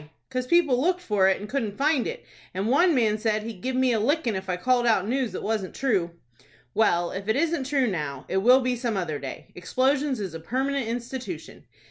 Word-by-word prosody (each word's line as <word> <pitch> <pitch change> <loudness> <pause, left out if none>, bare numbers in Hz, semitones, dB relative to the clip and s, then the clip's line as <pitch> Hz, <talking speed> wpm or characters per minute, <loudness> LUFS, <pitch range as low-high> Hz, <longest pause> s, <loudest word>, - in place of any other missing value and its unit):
"'Cause 255 -1 -2
people 295 -6 +3
looked 360 +4 +1
for 205 - +2
it, 190 - +1
and 205 - -7
couldn't 220 -5 -3
find 285 -2 +2
it, - - -6 0.3
and 195 +4 -1
one 330 +5 +4
man 215 -4 +2
said 215 -1 0
he'd 220 -5 -7
give 260 0 -2
me 260 -1 +3
a 225 - +1
lickin' 245 -1 +1
if 190 0 -5
I 180 - 0
called 245 +5 +2
out 210 -4 +2
news 255 0 0
that - - -6
wasn't 215 -4 -2
true." 190 -11 0 0.6
"Well, 175 -5 +2
if 195 +1 -6
it 220 - +2
isn't 320 -1 0
true 275 -1 +1
now, 150 - -3
it 190 - -1
will 250 +7 +6
be 250 0 0
some 235 -3 -2
other 160 -6 -2
day. 135 - -8
Explosions 265 +7 0
is 190 -5 -4
a 165 - -6
permanent 265 +7 -1
institution. 245 +6 -6
235 Hz, 215 wpm, -25 LUFS, 195-270 Hz, 0.6 s, will